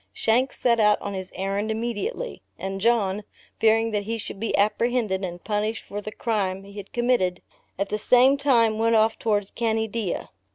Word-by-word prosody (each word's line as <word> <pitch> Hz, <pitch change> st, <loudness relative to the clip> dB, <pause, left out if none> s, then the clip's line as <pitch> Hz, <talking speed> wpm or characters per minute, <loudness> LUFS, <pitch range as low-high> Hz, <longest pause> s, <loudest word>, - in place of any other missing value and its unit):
Shanks 240 Hz, -, +1 dB
set 235 Hz, -2 st, +3 dB
out 210 Hz, -1 st, +4 dB
on 200 Hz, -, -5 dB
his 185 Hz, -1 st, -5 dB
errand 195 Hz, +3 st, -2 dB
immediately, 235 Hz, -, -3 dB, 0.2 s
and 195 Hz, 0 st, -4 dB
John, 210 Hz, -3 st, +2 dB, 0.4 s
fearing 225 Hz, 0 st, +3 dB
that 205 Hz, -1 st, -1 dB
he 230 Hz, +2 st, -2 dB
should 205 Hz, -, -7 dB
be 225 Hz, -, -1 dB
apprehended 215 Hz, -1 st, +1 dB
and 175 Hz, -1 st, -5 dB
punished 215 Hz, +1 st, -1 dB
for 205 Hz, +1 st, -5 dB
the 215 Hz, -, -6 dB
crime 195 Hz, -5 st, -1 dB
he 200 Hz, 0 st, -13 dB
had 200 Hz, -1 st, -9 dB
committed, 240 Hz, -7 st, +1 dB, 0.3 s
at 200 Hz, +1 st, -2 dB
the 210 Hz, -, -2 dB
same 255 Hz, +5 st, +5 dB
time 235 Hz, -6 st, +3 dB
went 230 Hz, 0 st, +3 dB
off 220 Hz, 0 st, +3 dB
towards 205 Hz, -3 st, 0 dB
Caneadea. 220 Hz, -3 st, -2 dB
215 Hz, 175 wpm, -25 LUFS, 200-230 Hz, 0.4 s, same